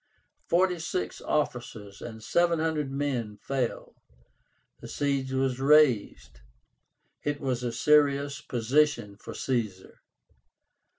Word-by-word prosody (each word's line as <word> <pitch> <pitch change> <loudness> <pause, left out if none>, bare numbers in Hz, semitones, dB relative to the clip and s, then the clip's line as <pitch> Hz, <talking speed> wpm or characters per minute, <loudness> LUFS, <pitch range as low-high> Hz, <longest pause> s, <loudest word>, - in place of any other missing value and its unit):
Forty 180 0 +2
six 175 +3 -3
officers 115 -8 -3
and 110 -2 -8
seven 170 +7 +2
hundred 155 -3 -1
men 130 -6 -2
fell. 130 +2 -3 0.9
The - - -9
siege 140 -2 -1
was 130 -1 0
raised. 125 - +3 0.8
It 145 0 -2
was 130 -3 -2
a 120 -1 -2
serious 140 +1 +2
position 120 -3 +1
for 105 - -10
Caesar. 110 -8 -3
135 Hz, 105 wpm, -28 LUFS, 115-150 Hz, 0.9 s, raised